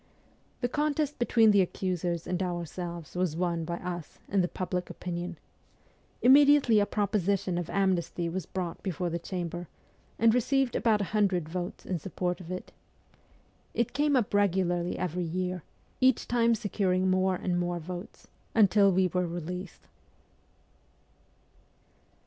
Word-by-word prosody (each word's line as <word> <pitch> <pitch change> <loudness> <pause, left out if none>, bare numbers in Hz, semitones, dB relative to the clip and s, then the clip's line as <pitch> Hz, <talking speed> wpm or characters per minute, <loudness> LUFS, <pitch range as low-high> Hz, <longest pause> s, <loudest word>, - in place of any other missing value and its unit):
The 245 - +2
contest 295 +1 -1
between 230 -2 +5
the 200 -1 +5
accusers 175 -2 -2
and 180 0 -2
ourselves 175 -2 -4
was 180 -3 0
won 170 -2 -1
by 170 +1 -3
us, 175 -3 -6
in 195 -1 +2
the 175 - +1
public 180 0 -3
opinion. 175 -1 -5 0.9
Immediately 275 -3 +6
a 205 - +2
proposition 200 -3 0
of 175 -1 -3
amnesty 185 -3 0
was 180 +2 -4
brought 180 -3 -4
before 180 -2 -2
the 170 - -2
Chamber, 175 -1 -5 0.5
and 225 0 +5
received 260 +1 +1
about 220 -3 +2
a 200 - -4
hundred 190 -6 +2
votes 175 +2 -5
in 180 -3 -2
support 180 +2 -3
of 170 - -10
it. 185 0 -6 1.0
It 235 - 0
came 290 0 +2
up 235 -6 +1
regularly 180 -3 +1
every 180 0 -2
year, 180 +1 -2 0.4
each 260 -2 +3
time 235 -1 +3
securing 190 -4 0
more 185 0 +2
and 180 -1 -1
more 175 0 -1
votes, 175 +4 -8 0.3
until 205 -2 +5
we 185 0 +3
were 180 0 -1
released. 175 +2 -6
185 Hz, 140 wpm, -29 LUFS, 175-210 Hz, 1.0 s, Immediately